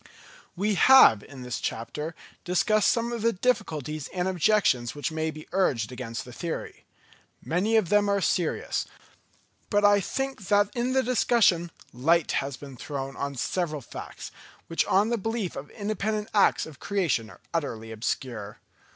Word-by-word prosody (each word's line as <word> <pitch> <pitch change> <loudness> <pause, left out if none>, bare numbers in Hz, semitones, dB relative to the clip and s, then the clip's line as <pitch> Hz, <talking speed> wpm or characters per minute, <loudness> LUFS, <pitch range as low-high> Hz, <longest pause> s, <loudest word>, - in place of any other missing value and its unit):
_ - - -30 0.5
We 205 +4 0
have 195 - +7
in 135 -3 -11
this 125 -1 -4
chapter 150 +8 -4 0.3
discussed 210 +4 +2
some 235 0 0
of 235 -2 -3
the 230 +1 +2
difficulties 155 - -1
and 180 0 -2
objections 175 - +2
which 145 +2 -3
may 160 0 -1
be 155 0 -9
urged 135 - +1
against 120 -2 -5
the 125 - -11
theory. 165 +6 -6 0.6
Many 195 +7 +1
of 215 -7 +3
them 205 0 +3
are 200 0 +2
serious; 180 -3 0 0.8
but 205 -1 +3
I 205 0 +5
think 270 -2 -4
that 205 +1 +3
in 245 +1 0
the 265 0 +3
discussion 230 -8 +3 0.2
light 160 +7 +2
has 135 -1 -2
been 135 -3 -11
thrown 135 0 -5
on 140 0 -4
several 155 +2 -2
facts, 115 - -9 0.3
which 165 - 0
on 205 +3 +3
the 235 -1 0
belief 225 -2 -3
of 135 - -7
independent 215 0 -3
acts 205 - +4
of 155 -3 -12
creation 170 - 0
are 85 - -15
utterly 115 -9 -3
obscure. 110 -1 -4
175 Hz, 160 wpm, -27 LUFS, 135-210 Hz, 0.8 s, have